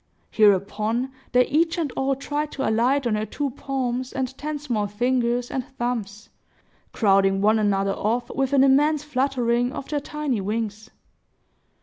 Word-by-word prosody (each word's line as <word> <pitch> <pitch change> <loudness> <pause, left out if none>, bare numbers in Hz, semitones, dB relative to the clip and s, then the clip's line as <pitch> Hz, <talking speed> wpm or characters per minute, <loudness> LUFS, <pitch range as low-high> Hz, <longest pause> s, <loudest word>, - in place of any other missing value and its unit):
Hereupon, 215 +4 +2 0.2
they 250 0 +4
each 330 +4 +1
and 315 -6 -1
all 270 +1 0
tried 295 +2 -3
to 275 - -2
alight 245 +5 +2
on 235 - +1
her 215 +1 -1
two 285 -2 -3
palms 255 -1 -3
and 265 -1 -3
ten 300 +2 -4
small 240 -8 -2
fingers 240 +2 0
and 260 - -2
thumbs, 225 -4 -3 0.6
crowding 195 -2 +3
one 215 +2 +3
another 195 -2 +1
off, 230 +5 -1
with 270 -1 -1
an 270 -1 +5
immense 290 +2 +3
fluttering 255 -4 0
of 275 - -7
their 295 - 0
tiny 285 -6 -3
wings. 215 +2 -3
245 Hz, 150 wpm, -24 LUFS, 215-275 Hz, 0.6 s, an